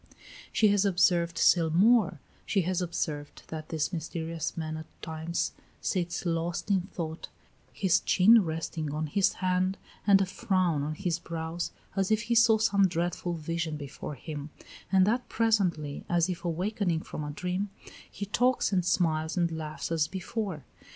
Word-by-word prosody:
She 215 Hz, -, +4 dB
has 200 Hz, -1 st, +3 dB
observed 175 Hz, -3 st, +2 dB
still 165 Hz, -3 st, +4 dB
more: 195 Hz, 0 st, +4 dB, 0.2 s
she 195 Hz, -, +1 dB
has 185 Hz, +1 st, 0 dB
observed 155 Hz, -4 st, -3 dB
that 155 Hz, -1 st, -6 dB
this 160 Hz, +3 st, -1 dB
mysterious 165 Hz, 0 st, -4 dB
man 155 Hz, -1 st, -3 dB
at 160 Hz, 0 st, -7 dB, 0.2 s
times 160 Hz, +1 st, -2 dB, 0.3 s
sits 175 Hz, 0 st, -2 dB
lost 170 Hz, +3 st, -1 dB
in 190 Hz, -2 st, +3 dB
thought, 160 Hz, -1 st, -5 dB, 0.4 s
his 185 Hz, -2 st, +2 dB
chin 215 Hz, +4 st, +6 dB
resting 160 Hz, -2 st, -3 dB
on 155 Hz, +1 st, -1 dB
his 185 Hz, +6 st, +2 dB
hand 185 Hz, +1 st, 0 dB, 0.3 s
and 200 Hz, -1 st, +7 dB
a 195 Hz, -, +2 dB
frown 185 Hz, -4 st, 0 dB
on 150 Hz, +2 st, -3 dB
his 175 Hz, -1 st, -1 dB
brows, 165 Hz, +1 st, -4 dB, 0.2 s
as 195 Hz, -1 st, +1 dB
if 215 Hz, +1 st, +2 dB
he 235 Hz, +2 st, 0 dB
saw 230 Hz, -1 st, +6 dB
some 200 Hz, -3 st, +4 dB
dreadful 175 Hz, 0 st, -2 dB
vision 165 Hz, 0 st, -3 dB
before 145 Hz, +1 st, -7 dB
him, 145 Hz, +2 st, -7 dB, 0.4 s
and 190 Hz, -1 st, +5 dB
that 240 Hz, +5 st, 0 dB
presently, 185 Hz, -10 st, +1 dB
as 175 Hz, +1 st, +2 dB
if 175 Hz, -2 st, -4 dB
awakening 175 Hz, 0 st, -1 dB
from 150 Hz, -, -6 dB
a 150 Hz, -, -4 dB
dream, 180 Hz, +6 st, -2 dB, 0.4 s
he 200 Hz, -, -5 dB
talks 245 Hz, +2 st, +2 dB
and 180 Hz, -2 st, +3 dB
smiles 160 Hz, -1 st, +1 dB
and 170 Hz, -1 st, +2 dB
laughs 155 Hz, 0 st, -5 dB
as 160 Hz, -2 st, +2 dB
before. 190 Hz, -, -4 dB
175 Hz, 160 wpm, -29 LUFS, 160-195 Hz, 0.4 s, and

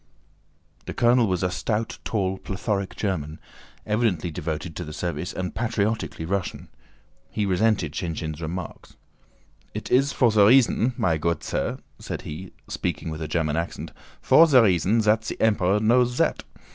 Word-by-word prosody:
The -, -, -5 dB
colonel 120 Hz, -1 st, +4 dB
was 90 Hz, -1 st, -1 dB
a 90 Hz, -, +1 dB
stout, 110 Hz, +4 st, -2 dB
tall, 95 Hz, -3 st, -1 dB
plethoric 100 Hz, 0 st, -3 dB
German, 80 Hz, -7 st, -3 dB, 0.5 s
evidently 105 Hz, -6 st, 0 dB
devoted 80 Hz, +1 st, -4 dB
to 90 Hz, -, -4 dB
the 75 Hz, -2 st, -8 dB
service 85 Hz, 0 st, -3 dB
and 90 Hz, -1 st, -4 dB
patriotically 110 Hz, -6 st, -2 dB
Russian. 95 Hz, +1 st, -3 dB, 0.6 s
He 105 Hz, -, -1 dB
resented 100 Hz, -4 st, +1 dB
Shinshín's 80 Hz, -2 st, -4 dB
remark. 85 Hz, +3 st, -6 dB, 0.9 s
"It -, -, -5 dB
is 135 Hz, +2 st, +4 dB
for 120 Hz, -4 st, +3 dB
the 105 Hz, -1 st, +5 dB
reasson, 125 Hz, 0 st, +4 dB
my 80 Hz, -3 st, +1 dB
goot 85 Hz, 0 st, -1 dB
sir," -, -, -2 dB, 0.2 s
said -, -, -6 dB
he, 85 Hz, +5 st, -7 dB, 0.2 s
speaking 80 Hz, -, -3 dB
with 80 Hz, 0 st, -6 dB
a 80 Hz, -, -3 dB
German 80 Hz, -1 st, 0 dB
accent, 85 Hz, +1 st, -4 dB, 0.3 s
"for 165 Hz, +2 st, +6 dB
the 130 Hz, -6 st, +6 dB
reasson 100 Hz, +3 st, +2 dB
zat 110 Hz, +1 st, +3 dB
ze -, -, -4 dB
Emperor 105 Hz, -3 st, +2 dB
knows 120 Hz, +3 st, +3 dB
zat. -, -, 0 dB
95 Hz, 155 wpm, -24 LUFS, 85-110 Hz, 0.9 s, for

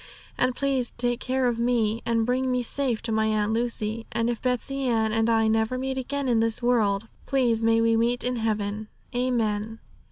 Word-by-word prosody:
And 255 Hz, -, 0 dB
please 270 Hz, -3 st, +1 dB
take 240 Hz, 0 st, -2 dB
care 260 Hz, 0 st, -1 dB
of 240 Hz, -2 st, 0 dB
me, 230 Hz, -2 st, +1 dB
and 230 Hz, -1 st, +1 dB
bring 255 Hz, +2 st, 0 dB
me 250 Hz, -1 st, 0 dB
safe 250 Hz, -2 st, 0 dB
to 230 Hz, -, -1 dB
my 220 Hz, 0 st, +1 dB
Aunt 215 Hz, 0 st, 0 dB
Lucy. 230 Hz, -1 st, -2 dB
And 230 Hz, +1 st, 0 dB
if 235 Hz, -, -5 dB
Betsey 265 Hz, +2 st, -1 dB
Ann 220 Hz, -2 st, +1 dB
and 225 Hz, +1 st, +1 dB
I 225 Hz, -1 st, +3 dB
never 220 Hz, +3 st, +1 dB
meet 265 Hz, +1 st, -2 dB
again 275 Hz, +1 st, -3 dB
in 235 Hz, -3 st, +2 dB
this 225 Hz, 0 st, +1 dB
world, 225 Hz, -4 st, +1 dB, 0.2 s
please 245 Hz, -4 st, +2 dB
may 225 Hz, 0 st, +3 dB
we 230 Hz, 0 st, +3 dB
meet 235 Hz, +2 st, +1 dB
in 250 Hz, 0 st, -1 dB
heaven. 215 Hz, -1 st, -2 dB, 0.3 s
Amen.' 225 Hz, -3 st, -1 dB
230 Hz, 195 wpm, -25 LUFS, 220-250 Hz, 0.3 s, I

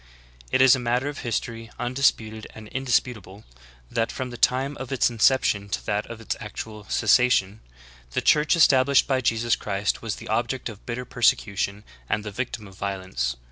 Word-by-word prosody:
It 130 Hz, -, +3 dB
is 130 Hz, 0 st, +7 dB
a -, -, -4 dB
matter 125 Hz, +3 st, 0 dB
of 145 Hz, -, -7 dB
history, 115 Hz, -1 st, -4 dB
undisputed 120 Hz, -4 st, 0 dB
and 110 Hz, -1 st, -10 dB
indisputable, 115 Hz, -6 st, -2 dB, 0.5 s
that 115 Hz, -1 st, 0 dB
from 130 Hz, -1 st, -5 dB
the -, -, -7 dB
time 130 Hz, +4 st, +1 dB
of 130 Hz, -1 st, -7 dB
its 130 Hz, -2 st, +2 dB
inception 110 Hz, -3 st, +2 dB
to -, -, -3 dB
that 105 Hz, 0 st, -1 dB
of 115 Hz, -1 st, -8 dB
its 115 Hz, -, -3 dB
actual 105 Hz, 0 st, -7 dB
cessation, 110 Hz, -3 st, +3 dB, 0.5 s
the -, -, 0 dB
Church 150 Hz, +2 st, +4 dB
established 140 Hz, -4 st, +5 dB
by 130 Hz, -2 st, 0 dB
Jesus 115 Hz, -1 st, +1 dB
Christ 100 Hz, 0 st, -2 dB
was 115 Hz, -3 st, -3 dB
the -, -, -10 dB
object 120 Hz, +3 st, -1 dB
of 105 Hz, -2 st, -12 dB
bitter 125 Hz, +1 st, -4 dB
persecution, 105 Hz, -4 st, 0 dB, 0.3 s
and 105 Hz, -, 0 dB
the 105 Hz, -, -6 dB
victim 110 Hz, -1 st, -5 dB
of 95 Hz, -, -15 dB
violence. 95 Hz, -11 st, -3 dB
115 Hz, 175 wpm, -25 LUFS, 105-130 Hz, 0.5 s, is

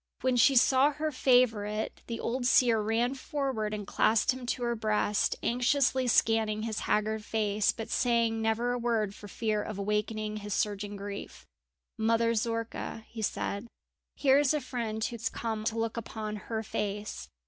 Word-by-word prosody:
When 255 Hz, -1 st, +2 dB
she 270 Hz, +3 st, +5 dB
saw 265 Hz, +4 st, +5 dB
her 305 Hz, +2 st, -2 dB
favourite 225 Hz, -5 st, +2 dB
the 230 Hz, -1 st, -4 dB
old 245 Hz, +1 st, -1 dB
seer 235 Hz, -4 st, +4 dB
ran 230 Hz, +4 st, +1 dB
forward 265 Hz, -6 st, -2 dB
and 210 Hz, -1 st, -4 dB
clasped 220 Hz, +5 st, +2 dB
him 255 Hz, -1 st, -8 dB
to 245 Hz, -, -1 dB
her 235 Hz, 0 st, 0 dB
breast, 210 Hz, -1 st, +1 dB
anxiously 255 Hz, +1 st, +2 dB
scanning 220 Hz, -2 st, +2 dB
his 220 Hz, -2 st, -2 dB
haggard 215 Hz, 0 st, +1 dB
face, 210 Hz, -1 st, +1 dB
but 225 Hz, 0 st, -7 dB
saying 230 Hz, -2 st, +2 dB
never 225 Hz, +2 st, +1 dB
a 245 Hz, -, -1 dB
word 225 Hz, -4 st, 0 dB
for 205 Hz, -, -11 dB
fear 215 Hz, +1 st, -1 dB
of 215 Hz, -1 st, -6 dB
awakening 210 Hz, +1 st, -2 dB
his 205 Hz, -1 st, -4 dB
surging 205 Hz, 0 st, -2 dB
grief. 200 Hz, 0 st, -7 dB, 0.5 s
"Mother 230 Hz, +1 st, +2 dB
Zorka," 230 Hz, 0 st, -3 dB
he 225 Hz, -, -7 dB
said, 205 Hz, +1 st, -2 dB, 0.5 s
"here 275 Hz, -1 st, +4 dB
is 290 Hz, +1 st, +3 dB
a -, -, +1 dB
friend 220 Hz, -4 st, -3 dB
who -, -, -4 dB
has 230 Hz, -, -2 dB
come 220 Hz, -2 st, -3 dB
to 225 Hz, 0 st, -1 dB
look 225 Hz, +1 st, -2 dB
upon 215 Hz, -1 st, -5 dB
her 220 Hz, +2 st, -4 dB
face!" 205 Hz, 0 st, -4 dB
225 Hz, 170 wpm, -30 LUFS, 215-245 Hz, 0.5 s, she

